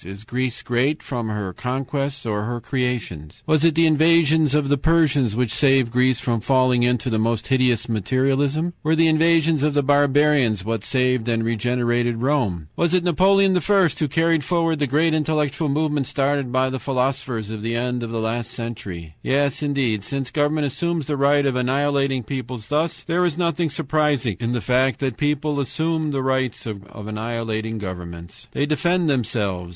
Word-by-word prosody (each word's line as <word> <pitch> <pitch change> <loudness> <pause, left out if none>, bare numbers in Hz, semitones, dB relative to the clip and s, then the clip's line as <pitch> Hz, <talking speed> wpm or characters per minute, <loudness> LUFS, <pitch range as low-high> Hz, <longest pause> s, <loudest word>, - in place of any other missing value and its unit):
Is 100 +3 -8
Greece 125 +2 -3
great 130 +6 0
from 120 -4 -4
her 105 -3 -4
conquests 135 +4 -3
or 105 -2 -1
her 120 +1 -3
creations? 115 - -4
"Was 155 -1 +2
it 165 -2 +3
the 165 +1 +4
invasions 160 -1 +3
of 150 -2 +1
the 145 +1 +2
Persians 145 -7 +2
which 120 -2 0
saved 135 -2 +3
Greece 125 +1 +2
from 115 -4 -1
falling 130 0 +2
into 125 0 +1
the 110 - +1
most 115 0 0
hideous 125 -3 +2
materialism? 135 - 0
"Were 155 +1 +1
the 165 0 +4
invasions 160 -1 +3
of 150 0 +1
the 145 - +2
barbarians 145 -6 +2
what 115 -2 -2
saved 125 -2 0
and 115 -1 0
regenerated 120 +1 0
Rome? 120 - 0
"Was 170 +1 +1
it 180 - +2
Napoleon 190 +2 +3
I. - - +3 0.4
who 150 - +1
carried 165 +2 +1
forward 165 0 0
the 145 - 0
great 155 +5 +2
intellectual 150 -1 0
movement 150 -2 0
started 140 -2 -1
by 130 +1 +1
the 130 - -3
philosophers 130 -5 -2
of 110 -1 -6
the 115 +2 -2
end 125 +1 -2
of 115 - -4
last 115 +1 -2
century? 110 -9 -7
"Yes, 140 +1 0
indeed, 135 -8 0
since 135 +2 -4
government 150 0 +1
assumes 165 +3 -2
the 145 - -2
right 140 +1 +3
of 135 -2 0
annihilating 135 0 0
peoples 125 -2 -6
thus, 155 +3 -1
there 175 +1 0
is 170 -3 0
nothing 170 -2 0
surprising 140 - 0
in 115 +1 -2
the 120 - -1
fact 130 0 +1
that 135 -2 0
the 110 - -17
peoples 150 0 -1
assume 160 +4 -1
the 135 -2 -2
right 130 -1 +1
of 105 -1 -8
annihilating 110 0 -3
governments. 85 -4 -8
"They 140 - 0
defend 175 +3 +1
themselves. 105 - -1
130 Hz, 175 wpm, -21 LUFS, 115-150 Hz, 0.4 s, the